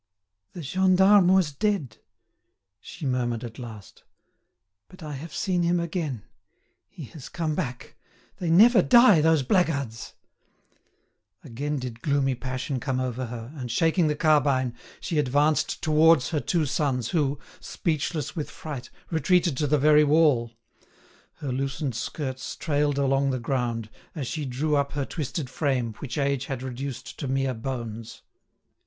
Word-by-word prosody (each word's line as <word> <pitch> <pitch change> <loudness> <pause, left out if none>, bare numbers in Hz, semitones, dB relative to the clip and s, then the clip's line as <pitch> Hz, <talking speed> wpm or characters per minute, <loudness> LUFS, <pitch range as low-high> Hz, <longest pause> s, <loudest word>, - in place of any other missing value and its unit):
"The 175 - -7
gendarme 190 +4 +4
was 185 -4 +4
dead," 150 - -1 0.8
she 155 - -9
murmured 120 -3 -1
at 115 -2 -8
last, 110 -5 -10 0.8
"but 185 -2 -14
I 150 - -6
have 150 +4 -7
seen 180 +1 0
him 170 +1 +2
again; 160 - -3 0.7
he 160 - -10
has 145 -5 -9
come 160 -3 -2
back. 125 -7 -5 0.4
They 175 - -3
never 210 +5 +7
die, 235 -6 +6
those 160 -2 +3
blackguards!" 140 - -1 1.3
Again 145 +5 -3
did 125 -3 -6
gloomy 140 -2 +1
passion 130 +2 -4
come 130 0 -2
over 130 -1 -3
her, 115 +3 -8
and, 125 -4 -6
shaking 165 +7 +2
the 150 - 0
carbine, 140 -5 +2 0.3
she 160 - -1
advanced 145 +3 +1
towards 155 -3 +4
her 155 - 0
two 165 +1 0
sons 130 -4 -1
who, 145 -4 0 0.2
speechless 155 -2 -3
with 155 -4 -4
fright, 145 -6 -7 0.2
retreated 170 0 +2
to 150 - 0
the 150 +2 +3
very 150 +1 +5
wall. 145 -6 +3 0.8
Her 140 -3 -5
loosened 135 +1 -2
skirts 130 +2 -4
trailed 145 -2 0
along 135 0 +2
the 130 - 0
ground, 115 -3 -2 0.2
as 145 -5 -3
she 150 +4 -4
drew 145 +4 -1
up 140 -1 0
her 140 -2 -2
twisted 150 -1 -4
frame, 130 -4 -1
which 130 -2 -6
age 140 -2 0
had 130 -2 -4
reduced 130 0 -6
to 140 - -3
mere 135 0 0
bones. 115 -2 -6
140 Hz, 145 wpm, -26 LUFS, 130-160 Hz, 1.3 s, never